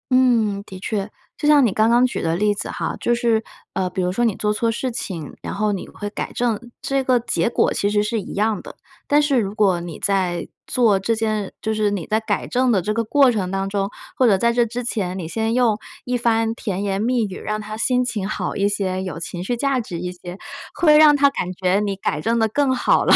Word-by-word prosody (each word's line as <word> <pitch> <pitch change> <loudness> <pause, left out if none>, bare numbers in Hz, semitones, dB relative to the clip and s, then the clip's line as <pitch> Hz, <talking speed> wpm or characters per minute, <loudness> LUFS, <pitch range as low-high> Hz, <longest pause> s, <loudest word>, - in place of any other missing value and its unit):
嗯， 230 -6 +3
的 190 - -9
确。 200 +1 -3 0.3
就 295 - -1
像 295 -3 +6
你 225 - +2
刚 220 +2 +3
刚 240 +2 +5
举 250 - -2
的 165 0 0
例 210 +3 +2
子 205 - -5
哈， - - -3
就 240 - +1
是 230 -2 +1 0.3
呃， 185 -1 -1
比 190 - -6
如 180 0 0
说 240 +6 0
你 220 -4 +1
做 210 - 0
错 230 +2 0
事 250 +3 -2
情， 175 - -6
然 - - -5
后 210 +1 +1
你 195 - -4
会 205 - -7
改 - - -4
正， 235 -3 0 0.2
这 275 0 +1
个 255 -1 +4
结 235 0 0
果 - - +2
其 200 - 0
实 205 0 +2
是 220 +1 -1
一 195 - -7
样 215 +1 0
的。 - - -11 0.3
但 290 - +4
是 285 -3 +2
如 200 -2 -2
果 190 -5 +3
你 170 -2 -7
在 185 -4 0 0.2
做 225 -6 +3
这 225 +4 0
件 215 -3 -2
就 220 - -1
是 215 -1 +1
你 190 -6 -3
在 215 - +1
改 220 - -2
正 255 0 +1
的 195 - +2
这 210 +5 -1
个 230 +1 0
过 275 +2 +5
程 200 -6 -1
当 195 +1 -2
中， 195 0 -1 0.3
或 255 - +4
者 200 -4 +5
在 235 +4 +2
这 240 0 +3
之 240 +2 -4
前， 190 -6 -2
你 175 -4 -5
先 225 +3 -1
用 235 -4 +2 0.2
一 250 - -2
番 225 -1 +1
甜 200 -4 -3
言 195 0 -1
蜜 240 +1 +1
语， 190 -2 -7
让 215 0 -3
她 215 0 -6
心 250 +2 +2
情 210 -6 -2
好 - - -3
一 200 0 +2
些， 190 -2 -1
有 185 -4 -5
情 175 +1 -6
绪 240 +6 -1
价 275 +1 +1
值 185 -7 -5
一 180 +1 -4
些， 180 0 -9 0.4
会 310 -4 +5
让 305 -1 +7
她 280 0 +5
感 185 -9 -3
觉 185 +1 +1
你 205 -1 -1
改 170 -6 -2
正 230 +7 +1
得 225 -1 +3
更 270 +2 +1
好 245 - +3
了， - - +6
215 Hz, 265 characters per minute, -21 LUFS, 195-240 Hz, 0.4 s, 让